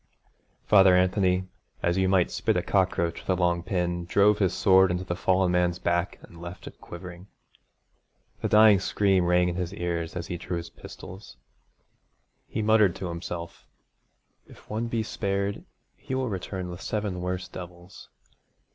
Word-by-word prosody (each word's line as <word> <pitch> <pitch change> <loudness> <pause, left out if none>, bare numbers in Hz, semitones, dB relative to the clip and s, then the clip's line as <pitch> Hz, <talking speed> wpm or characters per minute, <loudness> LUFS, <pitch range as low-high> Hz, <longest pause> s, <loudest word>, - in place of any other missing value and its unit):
Father 95 -3 +6
Anthony, 90 0 +2 0.4
as 85 0 +2
you 95 0 +2
might 95 -2 +2
spit - - 0
a - - 0
cockroach 85 -1 0
with - - -15
a 90 -1 +1
long 85 -1 +1
pin, 85 -1 -2
drove 100 +3 +3
his 95 -4 +2
sword 95 -1 +4
in 90 - 0
the 90 -1 -4
fallen 95 0 +2
man's 90 -1 +1
back 85 +1 -1
and 85 -1 -14
left 85 +1 -9
it - - -12
quivering. 90 +1 -10 1.1
The - - 0
dying 105 -2 +6
scream 95 -2 +1
rang 90 0 +3
in 85 -1 -3
his 90 +1 -3
ears 85 -2 -3
as 85 -2 -4
he 85 - -5
drew 85 +1 -4
his 85 0 -7
pistols. 95 -10 -11 1.1
He 110 - -3
muttered 105 -4 +4
to 95 -1 -5
himself: 85 0 -7 0.8
'If - - -17
one 110 +2 -2
be 115 -1 -1
spared 100 -1 -2 0.3
he 130 - -6
win 130 -2 -1
return 95 -2 -5
with 85 +1 -9
seven 105 -4 -3
worse 90 +1 -3
devils. 90 +1 -11
90 Hz, 165 wpm, -26 LUFS, 85-100 Hz, 1.1 s, Father